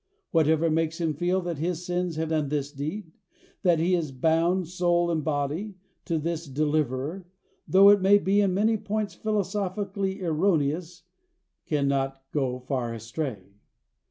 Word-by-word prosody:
Whatever 160 0 +3
makes 160 +1 0
him 165 -2 0
feel 175 +5 0
that 170 -4 -4
his 175 +2 -2
sins 180 -1 -1
have 160 0 -2
done 155 -3 0
this 145 -1 -2
deed, 160 +6 -5 0.5
that 175 -3 +3
he 170 +3 +1
is 165 -5 0
bound, 165 +6 +1
soul 175 0 +1
and 160 -2 -1
body, 155 +8 -2 0.3
to 165 - 0
this 165 +1 -3
Deliverer, 150 +4 -1 0.4
though 195 +1 +7
it 205 -1 +6
may 195 +2 +6
be 200 +1 +2
in 195 -2 +2
many 215 +4 +2
points 210 0 -3
philosophically 195 -1 -2
erroneous, 165 -1 0 0.6
cannot 135 -2 0
go 130 -4 -1
far 125 -2 -3
astray. 115 - -5
165 Hz, 145 wpm, -26 LUFS, 145-185 Hz, 0.6 s, though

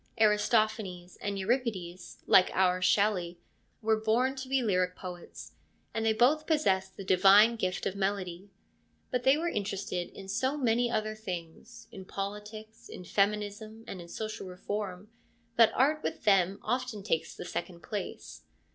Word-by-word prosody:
Aristophanes 210 -4 +1
and 200 -1 -3
Euripides, 195 -5 -3
like 185 - +6
our 185 -1 +3
Shelley, 185 -3 +2 0.5
were 220 0 +2
born 245 +5 +2
to 260 0 -6
be 270 -1 +2
lyric 185 -4 +1
poets, 175 - -9 0.4
and 225 - -1
they 225 - +3
both 275 +8 +3
possess 190 - +2
the 195 - -10
divine 195 +5 +6
gift 185 -4 -2
of 195 - -1
melody. 195 -1 -2 0.6
But 250 -1 -1
they 270 +2 +6
were 335 +2 -1
interested 195 - -3
in 195 - -11
so 260 +8 0
many 240 -2 +2
other 215 -2 -1
things, 205 +2 -8
in 190 -4 -9
politics, 210 +3 -7
in - - -8
feminism, 210 +3 -1
and 185 - -7
in 170 - -11
social 215 +2 -5
reform, 195 +1 -5 0.5
that 230 -2 +7
art 300 +4 +3
with - - -4
them 195 -2 +3
often 245 -3 -2
takes 165 -5 -1
the - - -7
second 175 -1 -5
place. 210 -2 -6
205 Hz, 150 wpm, -30 LUFS, 185-225 Hz, 0.6 s, that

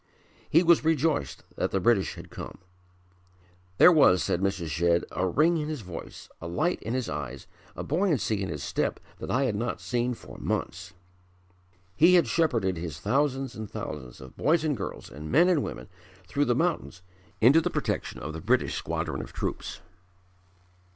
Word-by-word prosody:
He 165 +4 +5
was 170 -2 +5
rejoiced 160 -1 0
that - - 0
the 95 - 0
British 100 0 +2
had - - -11
come. - - -8 1.2
"There 180 - +9
was," 115 - +5
said 90 - 0
Mrs. 95 -4 -1
Shedd, 85 +2 +2
"a 95 - 0
ring 160 - +3
in 150 -1 -3
his 155 -5 -4
voice, 90 -4 -9
a 85 - -5
light 155 - 0
in 115 +3 -3
his 130 -3 -1
eyes, 70 -3 -5 0.3
a - - -5
buoyancy 150 - 0
in 95 - -2
his 75 - -5
step - - -1 0.2
that - - -6
I 130 +2 +2
had 130 - +1
not 115 +3 -2
seen 120 0 -1
for - - -12
months." 90 0 -3 1.0
He 175 +3 +6
had 175 - +5
shepherded 115 - +1
his 80 -4 -5
thousands 135 - 0
and 110 -2 -7
thousands 65 -5 -7
of 65 -1 -12
boys 160 +1 +2
and 150 -3 +1
girls, 95 -5 -6
and 75 +2 -8
men 170 +4 +5
and 175 -5 +3
women - - -6 0.4
through 145 +7 +1
the 120 - +2
mountains 160 - -1 0.4
into 135 +8 +6
the - - -1
protection - - -2
of 75 +2 -5
the 80 - -6
British 125 +5 +1
squadron - - -3
of - - -10
troops. - - -4
120 Hz, 180 wpm, -27 LUFS, -, 1.2 s, There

